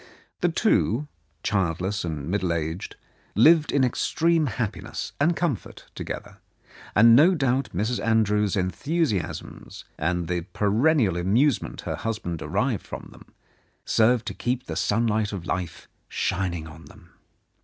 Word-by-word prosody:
The - - +2
two, 130 +8 +1 0.4
childless 95 0 -1
and 75 -4 -4
middle 95 -1 0
aged, 80 +1 -3 0.4
lived 155 - +5
in 140 - +3
extreme 160 +5 +1
happiness 115 -2 -4
and 165 +4 +3
comfort 160 - -3
together, - - -7 0.6
and 115 0 +7
no 170 +8 +6
doubt 135 -3 0
Mrs. 110 +7 -1
Andrews's 105 -3 +2
enthusiasms, 105 - -2
and 85 +1 -1
the 90 0 -1
peren 110 +10 +3
nial 95 - +2
amusement 115 +10 +1
her - - -4
husband 105 -7 -3
derived - - -1
from - - -8
them, - - -16 0.6
served 115 +1 +3
to - - -4
keep 125 +1 -2
the - - -5
sunlight 110 -1 +1
of 90 -4 -5
life 90 -3 -4 0.2
shining 90 -3 -2
on 80 +1 -12
them. - - -17
105 Hz, 135 wpm, -25 LUFS, 90-125 Hz, 0.6 s, and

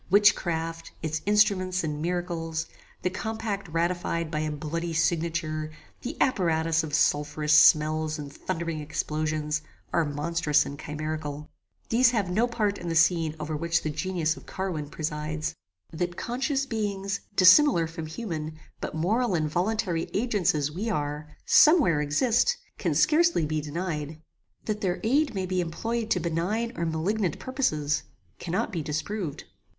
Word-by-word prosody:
Witchcraft, 165 -5 +2
its 155 0 -2
instruments 190 -3 +3
and 150 -1 -3
miracles, 165 -2 -2 0.4
the 180 - +1
compact 215 0 -3
ratified 170 0 -1
by 155 - -1
a 155 0 -1
bloody 165 +3 -3
signature, 160 -1 0 0.3
the 255 +5 -6
apparatus 165 -8 +2
of 155 - -5
sulpherous 150 0 +2
smells 155 0 +5
and 145 -2 -7
thundering 165 +1 -3
explosions, 155 0 -2 0.3
are 170 - +3
monstrous 150 0 +1
and 140 0 -7
chimerical. 150 -1 -5 0.4
These 240 +2 +5
have 210 -7 0
no 220 +6 +2
part 215 -4 -1
in 175 - -5
the 165 - -1
scene 160 -1 +3
over 155 +1 -3
which 170 +2 0
the 155 - -1
genius 165 -1 -1
of - - -14
Carwin 175 -7 -3
presides. 155 0 -3 0.4
That 175 +2 -3
conscious 270 +3 -1
beings, 200 -5 -2 0.2
dissimilar 185 - +7
from 165 0 -6
human, 160 -4 -5 0.2
but - - -5
moral 205 +6 +1
and 155 -2 +1
voluntary 175 0 -1
agents 200 -6 +2
as 150 -1 0
we 200 +9 -3
are, 150 -4 -2 0.2
some 315 +3 +7
where 165 - +2
exist, 240 - +2 0.2
can - - 0
scarcely 325 - +4
be 155 0 -1
denied. 155 -1 -4 0.5
That 210 -1 -2
their 180 -2 0
aid 270 +2 +2
may 190 -1 -1
be 185 0 0
employed 225 +7 -3
to 180 - +2
benign 175 +8 -1
or 170 0 -1
malignant 175 +3 -1
purposes, 155 - 0 0.4
cannot 180 +5 -2
be 170 -5 -2
disproved. 155 +3 -3
170 Hz, 145 wpm, -27 LUFS, 155-200 Hz, 0.5 s, dissimilar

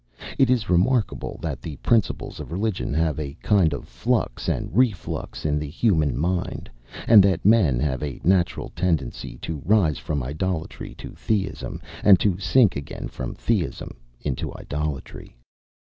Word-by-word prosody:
It 135 -2 +5
is 120 -4 +2
remarkable, 100 +6 +1
that 75 -7 -3
the 80 0 -6
principles 110 - 0
of - - -8
religion 100 +3 -2
have 80 -2 +1
a 70 -2 -5
kind 95 -7 +4
of 70 - -5
flux - - -1
and - - -2
reflux 115 -11 0
in 75 -1 +1
the 75 -1 -4
human 80 - +1
mind, 90 +4 -2 0.4
and 110 -3 +9
that 95 -3 +2
men 95 - +5
have 65 -2 -1
a 70 -4 -4
natural 90 0 +1
tendency 80 -8 -2
to 80 -4 -4
rise 90 -4 +3
from 75 -4 -2
idolatry 80 +5 -4
to - - -9
Theism, 100 -3 -3 0.2
and 95 -4 +7
to 95 -1 +1
sink 115 0 +4
again 70 -1 -6
from 65 - -6
Theism 100 - -2 0.3
into 70 -4 -3
idolatry. 75 -4 -5
85 Hz, 150 wpm, -24 LUFS, 75-100 Hz, 0.4 s, and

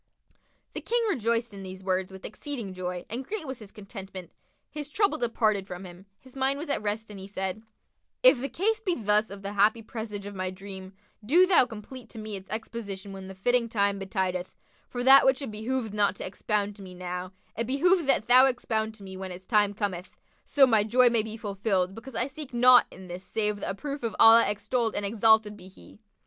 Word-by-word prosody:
The - - -5
King 475 0 0
rejoiced 235 - -1
in 200 - -8
these 190 0 -9
words 185 0 -1
with 190 0 -10
exceeding 230 -4 -6
joy 180 -1 -5
and 240 +4 -4
great 400 +4 -5
was 265 -2 -6
his 210 -3 -11
contentment; 195 -3 -9 0.4
his 295 -1 -7
trouble 395 -2 +1
departed 215 -4 +1
from 180 0 -7
him, 180 +2 -12
his 260 0 -18
mind 270 +1 +1
was 305 +2 -6
at 280 - 0
rest 215 +1 -3
and 200 - -9
he 190 - -8
said, 190 +1 -3 0.6
"If 400 - +7
the 275 - -3
case 425 - 0
be 370 -5 0
thus 210 -2 +1
of 200 0 -9
the 200 +1 -4
happy 215 +3 +3
presage 215 -3 -6
of 205 - -7
my 185 -1 -3
dream, 190 0 -9 0.3
do 330 - +5
thou 355 -9 +5
complete 235 +3 -10
to - - -12
me 215 -1 -5
its 190 -1 -9
exposition 210 -3 -5
when 190 -1 -8
the 190 - -9
fitting 240 +4 +1
time 200 -2 +1
betideth: 190 -2 -3 0.3
for 245 -1 -4
that 270 +2 +8
which 265 +1 +2
it 265 - -5
behoveth 220 +1 -3
not 205 -2 +2
to - - -6
expound 205 +2 -2
to - - -12
me 185 -1 -10
now, 180 0 -5 0.2
it 230 +1 -2
behoveth 330 +5 +2
that 245 - +3
thou 255 +2 +7
expound 220 -4 -2
to 205 - -13
me 190 -1 -8
when 190 0 -6
its 180 +1 -9
time 210 -2 +3
cometh, 190 -4 -4 0.3
so 280 -2 +5
my 220 -5 +3
joy 245 +3 +4
may 230 -2 +3
be 220 +1 -7
fulfilled, 195 -3 -1
because 235 +3 -10
I 235 - +1
seek 280 -2 -8
naught 250 0 +7
in 185 0 -12
this 180 +1 -7
save 210 +2 -1
the - - -4
approof 280 +8 -5
of 230 -2 -3
Allah 225 -1 +8
extolled 215 +3 -1
and 205 - -1
exalted 220 0 +3
be 185 -2 -13
He!" 190 +2 -16
215 Hz, 215 wpm, -27 LUFS, 195-245 Hz, 0.6 s, that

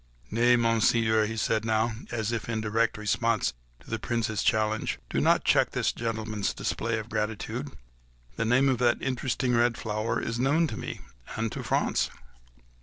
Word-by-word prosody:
"Nay, 120 +2 +4
Monseigneur," 115 -1 +3
he 110 +1 -5
said 110 +1 +1
now, 110 +1 +1 0.2
as 115 -1 -2
if 115 -1 -3
in 110 -1 -1
direct 110 +1 0
response 105 - +1 0.3
to - - -20
the - - -1
Prince's 110 -3 -1
challenge, 110 0 +1 0.2
"pray - - 0
do - - +1
not - - +4
check - - +3
this - - +1
gentleman's 110 -3 -3
display 115 0 -1
of 110 0 -5
gratitude; 110 -1 -3 0.6
the 115 - -1
name 125 +4 +3
of 130 -3 +2
that 120 -1 +3
interesting 130 -1 -1
red 120 0 +3
flower 110 +1 -2
is 115 +1 -3
well 135 +3 +2
known 165 +2 +4
to 130 - -4
me—and 65 - -6
to - - -5
France." - - +1
115 Hz, 175 wpm, -28 LUFS, 110-120 Hz, 0.6 s, Nay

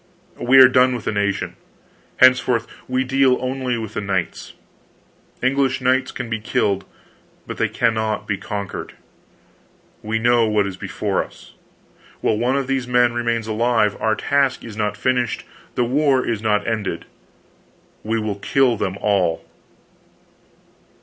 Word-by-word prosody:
We 130 +2 +4
are 130 -1 +10
done 130 0 +3
with 120 - -7
the - - 0
nation; 100 -1 -1 0.6
henceforth 130 -2 +4 0.2
we 130 +1 0
deal 130 -1 +3
only 130 -1 -2
with 110 -2 -6
the - - -3
knights. 95 -4 -3 0.9
English 135 0 +1
knights 130 +1 +1
can 125 - -6
be 115 -1 -3
killed, 100 -3 0 0.6
but - - -7
they - - +1
cannot 110 -2 -1
be 105 - 0
conquered. 100 0 -6 1.1
We 110 +1 -2
know 120 0 +3
what 105 -2 +2
is 100 -1 -5
before - - -2
us. - - -16 0.7
While 110 - 0
one 125 +3 +1
of 140 - -1
these 135 -1 -2
men 125 -1 +3
remains 120 -1 -1
alive, 110 -1 +1
our 110 -1 +2
task 140 0 0
is 110 -3 -9
not 105 -1 -2
finished, 125 -2 0 0.3
the 125 - +2
war 135 +1 +2
is 115 -3 -2
not 105 -2 +1
ended. 110 -3 -2 1.0
We 110 +1 -1
will 105 -2 -3
kill 125 +3 +2
them 95 -1 -2
all." 90 -5 +1
115 Hz, 145 wpm, -21 LUFS, 105-130 Hz, 1.1 s, are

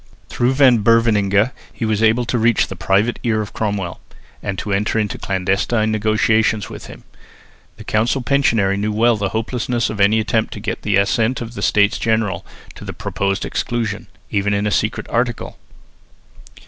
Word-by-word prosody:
Through 125 +2 0
Van 130 -4 +5
Beverningh 110 -1 +3 0.2
he 115 - -4
was 110 -1 0
able 115 +2 +3
to 120 0 -1
reach 115 0 +3
the 95 - -6
private 95 +6 +1
ear 115 -3 0
of 105 -1 -5
Cromwell, 100 -5 -3 0.4
and 100 -1 -4
to 100 - -3
enter 105 +3 0
into 105 -2 -1
clandestine 100 +4 0
negotiations 110 0 +1
with - - -9
him. - - -12 0.7
The - - -10
council 120 +5 0
pensionary 115 -8 +2
knew 105 +1 -1
well 115 +2 +3
the 100 -2 -2
hopelessness 120 +3 -2
of 105 -2 -4
any 105 +3 +4
attempt 110 +1 0
to - - -7
get 110 +2 -4
the 105 -2 0
assent 110 +5 +1
of 120 -1 -7
the - - -7
States 100 0 +2
General 110 -5 0 0.3
to - - -12
the - - -6
proposed 100 0 -2
exclusion, 115 -4 -3 0.2
even 100 +1 +1
in 100 +1 -1
a 105 - 0
secret 110 +2 -1
article. 120 0 -2
110 Hz, 175 wpm, -19 LUFS, 100-115 Hz, 0.7 s, Van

